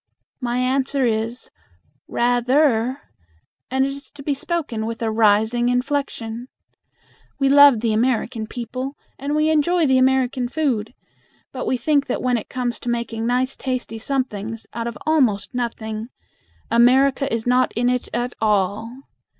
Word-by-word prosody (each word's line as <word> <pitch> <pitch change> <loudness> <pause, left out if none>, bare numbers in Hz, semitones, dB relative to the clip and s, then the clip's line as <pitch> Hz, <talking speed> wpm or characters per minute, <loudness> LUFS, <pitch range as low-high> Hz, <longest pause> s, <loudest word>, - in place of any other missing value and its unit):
My 245 -2 -2
answer 265 +1 +1
is, 230 +2 -2 0.6
"Rather," 245 +1 +2 0.7
and 265 +1 +2
it 275 - -2
is 280 +1 -9
to 280 - -10
be 290 - 0
spoken 280 -7 -3
with 230 0 -5
a 220 - 0
rising 220 +2 +3
inflection. 245 -2 -2 0.9
We 275 -1 +2
love 285 -4 +7
the 230 -2 +1
American 230 -1 0
people, 255 +4 -5 0.2
and 285 +2 -2
we 305 +1 +2
enjoy 325 +2 +2
the 260 -2 +4
American 260 -1 +2
food, 250 -7 -1 0.6
but 255 - -5
we 255 - +1
think 285 +3 +1
that 250 - -2
when 250 -2 +2
it - - -12
comes 245 -2 -2
to 245 - -5
making 235 -1 -2
nice 255 +2 0
tasty 255 -4 -4
somethings 225 -4 -3
out 230 0 -3
of 235 - -5
almost 240 -11 +2
nothing, 225 -2 -4 0.6
America 265 +4 +4
is 225 -1 -2
not 250 +1 +3
in 240 +2 +1
it 250 0 0
at 240 +1 -2
all. 215 +4 0
245 Hz, 150 wpm, -21 LUFS, 230-270 Hz, 0.9 s, love